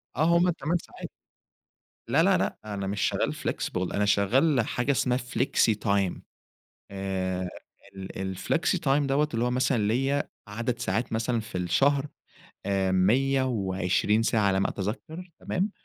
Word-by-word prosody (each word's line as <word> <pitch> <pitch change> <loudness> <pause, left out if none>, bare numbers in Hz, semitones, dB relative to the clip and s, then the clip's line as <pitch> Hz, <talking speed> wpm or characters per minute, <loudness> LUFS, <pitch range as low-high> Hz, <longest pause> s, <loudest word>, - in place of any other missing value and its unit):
آه 150 - +1
هُم 180 +1 +3
ال8 170 0 0
ساعات، - - -10 1.0
لا، - - +4
لا، - - +4
لأ، - - -1
أنا 100 -2 -4
مش 100 0 -3
شغّال - - 0
flexible 90 0 -3
أنا 105 - +2
شغّال 125 +8 +3
حاجة 125 +3 -1
اسمها 125 -2 +1
flexy 125 -3 +1
time 100 -3 +1 0.7
آآ 95 -2 -2 0.5
ال 95 0 -5
الflexy 170 - 0
time 140 +1 +3
دَوّة 140 +2 +2
اللي 115 - +1
هو 125 - +1
مثلًا 125 0 +1
ليّا 135 +5 0 0.2
عدد 120 +3 -3
ساعات 110 +6 -2
مثلًا 115 +1 0
في 105 -4 -6
الشهر، 140 +10 +2 0.6
آآ، 95 -1 +1
120 105 -2 +2
ساعة 115 -1 +2
على 95 0 +2
ما - - +1
أتذكّر 155 - -5
تمام، 190 +4 -1
115 Hz, 145 wpm, -27 LUFS, 95-135 Hz, 1.0 s, لا